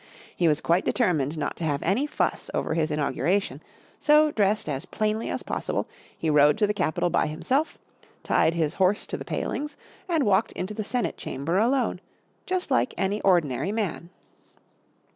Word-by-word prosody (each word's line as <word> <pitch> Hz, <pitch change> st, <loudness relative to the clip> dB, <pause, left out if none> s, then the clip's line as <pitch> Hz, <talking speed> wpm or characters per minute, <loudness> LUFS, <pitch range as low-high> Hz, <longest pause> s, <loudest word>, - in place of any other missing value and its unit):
He 175 Hz, -, +2 dB
was 150 Hz, -1 st, +2 dB
quite 170 Hz, +2 st, +2 dB
determined 160 Hz, -, +1 dB
not 150 Hz, -, -2 dB
to -, -, -5 dB
have 145 Hz, -3 st, -1 dB
any 215 Hz, -, +1 dB
fuss -, -, -1 dB
over -, -, -1 dB
his 160 Hz, -1 st, 0 dB
inauguration, 150 Hz, +6 st, 0 dB, 0.4 s
so 300 Hz, 0 st, +5 dB
dressed 210 Hz, -, +1 dB
as 145 Hz, +3 st, -3 dB
plainly 215 Hz, +1 st, -1 dB
as -, -, -3 dB
possible, -, -, -2 dB, 0.3 s
he 165 Hz, -, -3 dB
rode 150 Hz, -1 st, +5 dB
to 210 Hz, -, +3 dB
the 210 Hz, -, 0 dB
Capitol 175 Hz, -3 st, 0 dB
by -, -, +2 dB
himself, 260 Hz, -, -1 dB, 0.5 s
tied 165 Hz, -, +2 dB
his 160 Hz, -3 st, 0 dB
horse 190 Hz, +2 st, +3 dB
to -, -, -5 dB
the -, -, -6 dB
palings 295 Hz, 0 st, -4 dB, 0.3 s
and 325 Hz, -4 st, +2 dB
walked 205 Hz, +1 st, +2 dB
into 185 Hz, +3 st, -4 dB
the 215 Hz, -, -3 dB
Senate 245 Hz, +4 st, -2 dB
Chamber 160 Hz, +8 st, -2 dB
alone, 250 Hz, +4 st, +1 dB, 0.5 s
just 365 Hz, -5 st, -1 dB
like 255 Hz, -1 st, +1 dB
any 200 Hz, +2 st, -1 dB
ordinary 175 Hz, -3 st, +2 dB
man. 200 Hz, -6 st, -3 dB
190 Hz, 170 wpm, -26 LUFS, 155-225 Hz, 0.5 s, so